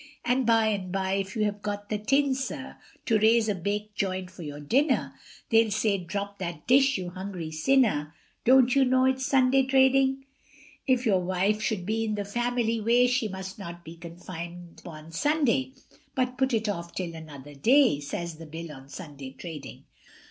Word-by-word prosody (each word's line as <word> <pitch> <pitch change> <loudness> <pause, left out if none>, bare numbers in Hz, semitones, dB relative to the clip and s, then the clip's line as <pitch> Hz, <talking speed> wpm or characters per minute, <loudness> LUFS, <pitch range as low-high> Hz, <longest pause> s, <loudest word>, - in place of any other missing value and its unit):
And 250 0 +1
by 225 -1 +4
and 195 -4 -3
bye, 190 0 -1
if 195 +1 -2
you 215 - +1
have 205 -1 -2
got 205 0 -4
the 210 - -1
tin, 275 +5 +2
sir, 265 0 -5 0.3
To 225 -3 +3
raise 220 +1 +4
a 210 - +1
baked 205 +3 -3
joint 185 -2 -2
for 180 - -12
your 145 -2 -7
dinner, 265 - +1 0.4
They'll 225 0 +5
say, 210 -1 +1
drop 200 +3 -5
that 170 -4 -5
dish, 270 +1 +5
you 180 -1 -5
hungry 185 -3 -6
sinner, 160 - +2 0.3
Don't 255 0 +5
you 275 - +5
know 260 0 +3
it's 260 0 +1
Sunday 265 0 +4
trading? 265 0 +3 0.6
If 255 -1 +2
your 195 -5 +3
wife 185 +4 0
should 195 -3 -2
be 220 +3 0
in 215 -1 -1
the 205 -1 -3
family 235 +1 -1
way, 240 +3 +4
She 250 -2 +1
must 190 0 -7
not 170 -2 -8
be 165 +1 -9
confined 170 0 -9
upon 160 -2 -11
Sunday, 230 - +1 0.4
But 255 -1 0
put 265 0 +1
it 220 0 -1
off 170 -4 -4
till 175 -3 -3
another 145 -3 -10
day, 240 - +4
Says 160 +3 -5
the 165 - -9
Bill 165 +1 -7
on 135 -1 -12
Sunday 140 -3 -9
trading. 160 -5 -8
205 Hz, 185 wpm, -27 LUFS, 170-245 Hz, 0.6 s, They'll